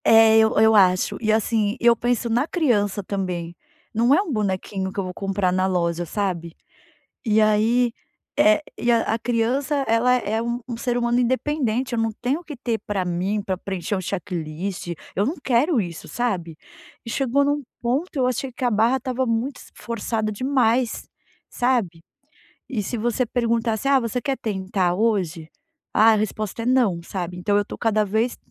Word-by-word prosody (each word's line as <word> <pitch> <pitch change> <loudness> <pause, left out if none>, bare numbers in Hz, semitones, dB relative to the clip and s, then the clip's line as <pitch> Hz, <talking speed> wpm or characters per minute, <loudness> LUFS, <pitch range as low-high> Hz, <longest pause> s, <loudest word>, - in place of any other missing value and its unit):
É 225 0 +7
eu 220 0 +3
eu 220 0 +6
acho 185 -2 +4
e 220 -1 +2
assim, 220 0 +1
eu 235 -1 +5
penso 240 0 0
na 245 +6 +1
criança 210 - +1
também, 180 -3 -4 0.4
não 235 +4 +3
é 365 - +3
um 385 -6 -5
bonequinho 190 -2 -2
que 200 - -5
eu - - 0
vou 185 0 -5
comprar 195 -1 -1
na 185 +1 +1
loja, 175 -2 0
sabe. 175 -4 -3 0.7
E 220 -1 +3
aí, 225 +3 +3 0.5
eh, 310 +1 +5 0.4
a 225 - 0
criança 245 +5 0
ela 230 +3 +3
é 220 -2 -1
um 235 +1 -2
um 240 -2 -5
ser 240 +1 -1
humano 240 0 +1
independente 255 -1 0
eu 235 - 0
não 225 0 0
tenho 260 +6 0
o - - -14
que 300 - -7
ter 235 -3 -2
para 200 -3 -1
mim 180 +4 -1
para 190 -1 -2
preencher 190 +1 -3
um - - -3
checklist 180 -1 -4 0.3
eu 200 - +1
não 290 +8 -1
quero 260 +2 +2
isso, 170 -3 -7
sabe. 185 -10 -2 0.5
E - - -6
chegou 270 +3 +1
em 285 - +1
um 290 0 -1 0.2
ponto 270 +9 -1
eu 260 -3 +2
achei 255 +1 -2
que 260 - -7
a 245 - +2
barra 225 +5 +3
estava 260 0 -2
muito 240 +3 -1
s - - -13
forçada 220 -1 -3
demais, 250 0 0 0.4
sabe. 235 -10 0 0.7
E 230 -6 -2
se 240 - -4
você 240 +3 0
perguntasse: 230 -1 -1
"Ah, 275 -1 +4
você 235 +1 -2
quer 270 +2 -1
tentar 190 -5 -1
hoje"? 185 -7 0 0.5
Ah, 225 +1 +6
a - - +4
resposta 215 +1 -3
é - - -4
"não" 245 -9 +2
sabe, 180 0 -5
então 205 +3 +1
eu 205 - +3
estou - - -9
cada 215 -2 +2
vez 220 +4 0
225 Hz, 185 wpm, -23 LUFS, 195-245 Hz, 0.7 s, É